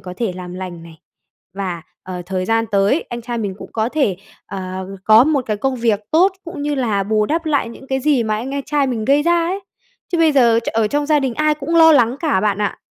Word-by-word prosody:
có 180 -1 -8
thể 225 -6 -2
làm 180 0 -8
lành 180 -2 -7
này, 165 -1 -14 0.6
và, 185 -4 -4 0.2
ờ, 180 -1 -6
thời 185 0 -2
gian 225 +3 +1
tới, 200 +10 +2
anh 240 -1 -6
trai 240 0 -4
mình 200 -4 -3
cũng - - -11
có 220 0 0
thể, 255 - 0 0.3
ờ, 185 -1 -6 0.2
có 220 +3 +7
một 285 -5 0
cái 215 -1 -1
công 265 +4 -1
việc 230 -4 +1
tốt, 360 +5 +4
cũng 330 -4 -7
như 295 0 -1
là 220 -7 0
bù 215 +1 +1
đắp 325 +4 -1
lại 285 -6 +1
những 265 +3 -12
cái 265 0 -1
gì 275 -3 +2
mà 215 -1 -1
anh 260 +5 -5
anh 280 - -2
trai 290 -1 0
mình 230 -4 -2
gây 285 +3 +3
ra 340 0 +2
ấy. 380 +3 -2 0.5
Chứ 340 - +1
bây 320 -2 +4
giờ 235 -5 +4
ch - - -3
ở 220 -1 +1
trong 290 +4 -1
gia 305 -1 +3
đình 260 -4 -2
ai 305 0 +2
cũng 305 +3 -2
lo 320 -1 +8
lắng 245 -2 +3
cả 305 - +1
bạn 205 -1 0
ạ. 205 -1 -2
235 Hz, 255 wpm, -19 LUFS, 200-290 Hz, 0.6 s, lo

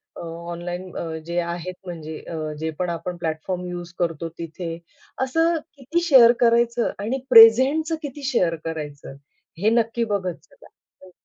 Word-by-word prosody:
अ, - - -8
online 175 +2 -6
अ, 170 - -3 0.2
जे 170 +1 -1
आहेत 170 +1 -4
म्हणजे 160 -3 -7
अ, 170 - -8 0.2
जे 160 +1 -2
पण 180 -1 -1
आपण 170 +1 -4
प्लॅटफॉर्म 170 +2 -3
यूज 175 -1 -7
करतो 165 -1 -1
तिथे. 165 0 -5 0.4
असं 325 +6 +2 0.2
किती 285 +6 -1
शेअर 245 -5 +8
करायचं 235 0 +3
आणि 225 +6 -2
प्रेझेंटचं 260 +8 +7
किती 290 -1 -7
शेअर 175 -9 +2
करायचं 150 -4 -6 0.5
हे 215 - +4
नक्की 230 0 +1
बघत 200 -4 -1
जावा. - - -19 0.3
हो. 185 -1 -15
180 Hz, 150 wpm, -23 LUFS, 170-235 Hz, 0.5 s, शेअर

